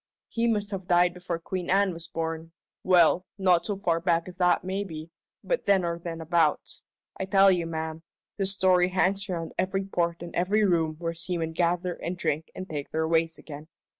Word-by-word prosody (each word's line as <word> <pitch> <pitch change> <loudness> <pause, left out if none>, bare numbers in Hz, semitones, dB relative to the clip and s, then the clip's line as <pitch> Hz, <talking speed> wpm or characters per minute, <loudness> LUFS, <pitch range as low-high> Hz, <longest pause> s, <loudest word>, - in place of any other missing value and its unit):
He 230 0 0
must 210 -3 0
have 190 -2 -5
died 175 -1 +4
before 180 -1 -4
Queen 175 +1 -5
Anne 195 0 +3
was 165 0 -8
born 165 0 -4 0.3
well, 180 0 +4
not 180 -3 +3
so 205 - -1
far 170 -4 0
back 170 0 +1
as 180 0 -10
that 180 -2 +3
maybe, 180 -4 -5 0.3
but - - -1
then 195 -3 +3
or 170 0 -2
thenabouts. 165 -2 -1 0.4
I 190 - -1
tell 195 0 +5
you, 175 -2 0
ma'am, 160 0 -4 0.4
this 195 -1 +2
story 185 -2 +3
hangs 195 +2 0
around 165 -3 -4
every 195 +1 0
port 170 -3 -1
and 170 - -8
every 205 +4 +2
room 165 -4 +1
where 165 0 -3
seamen 170 -1 -2
gather 175 +1 0
and 175 +1 -5
drink 160 -2 -2
and 185 - -6
take 145 -4 -5
their 160 0 -1
ways 165 0 +1
again. 150 0 -10
175 Hz, 190 wpm, -27 LUFS, 165-190 Hz, 0.4 s, tell